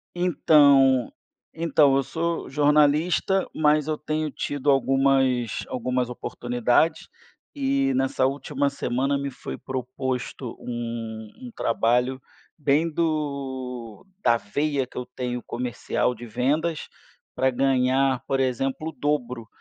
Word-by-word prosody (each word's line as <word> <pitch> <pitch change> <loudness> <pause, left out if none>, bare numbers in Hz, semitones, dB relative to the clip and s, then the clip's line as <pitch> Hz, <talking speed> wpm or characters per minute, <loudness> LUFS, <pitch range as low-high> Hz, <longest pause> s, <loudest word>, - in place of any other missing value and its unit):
Então 140 -7 +4 0.4
então 155 -4 +3
eu 135 - +1
sou 170 +3 -3
jornalista, 150 +6 +3
mas 150 -1 +3
eu 155 -1 -1
tenho 155 +1 -2
tido 145 +1 -2
algumas 135 -3 +2
algumas 125 0 -1
oportunidades 125 +6 0 0.5
e 275 -1 +1
nessa 275 - +1
última 140 +1 -1
semana 135 0 -1
me 140 0 -3
foi - - -7
proposto 130 -1 -4
um 115 -2 -5
um 245 - -8
trabalho 125 +3 +1 0.4
bem 150 +2 +2
do 135 - -3 0.2
da 120 - +4
veia 140 +6 -1
que - - -15
eu 125 - -3
tenho 125 -1 -4
comercial 125 0 -2
de 120 0 -10
vendas 145 +8 -1 0.4
para 130 - +2
ganhar, 130 0 +2
por 135 - 0
exemplo, 135 +4 -1
o - - -7
dobro. 125 -7 -2
135 Hz, 115 wpm, -25 LUFS, 125-150 Hz, 0.5 s, Então